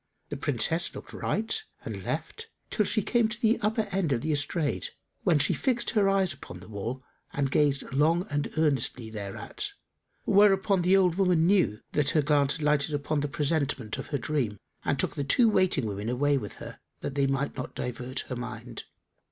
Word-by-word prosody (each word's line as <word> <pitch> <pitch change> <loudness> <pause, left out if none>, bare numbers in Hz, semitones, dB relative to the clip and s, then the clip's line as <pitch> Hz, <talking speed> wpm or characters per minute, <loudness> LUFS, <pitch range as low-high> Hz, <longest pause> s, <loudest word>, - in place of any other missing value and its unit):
The - - -4
Princess - - +1
looked - - -9
right 225 - +1 0.2
and - - -5
left, 455 0 -4 0.2
till 210 - +2
she 215 - +1
came 235 0 +2
to 220 +1 -5
the 230 -1 +3
upper 220 +2 +1
end 190 -5 0
of 120 -3 +1
the 155 - -1
estrade, 145 +1 0 0.3
when 175 -5 +3
she 145 - +3
fixed 240 -3 0
her 200 -3 +3
eyes 195 -2 +2
upon 90 - -10
the 90 - -13
wall 110 +5 -5 0.3
and 140 -2 0
gazed 145 -1 +2
long 165 +6 +3
and 145 0 -1
earnestly 130 -6 0
thereat; 100 -3 -4 0.5
whereupon 195 -1 +4
the 185 +3 +4
old 180 -2 +3
woman 180 -4 +3
knew 175 - +2
that 145 -1 +1
her 150 - +4
glance 145 -1 +3
had 155 - -3
lighted 150 0 +2
on 155 - +3
the 145 - -1
presentment 145 -6 -1
of - - -6
her 145 - -1
dream 125 -6 -1 0.3
and - - 0
took - - -1
the 145 - -2
two 230 - +4
waiting 185 - +2
women 105 +1 -3
away 145 +4 +2
with 105 -7 -3
her, - - -10 0.2
that - - -4
they 140 -1 +2
might 135 +1 -1
not 130 - -6
divert 125 +2 -4
her 130 - -6
mind. 120 -1 -7
145 Hz, 195 wpm, -28 LUFS, 130-190 Hz, 0.5 s, whereupon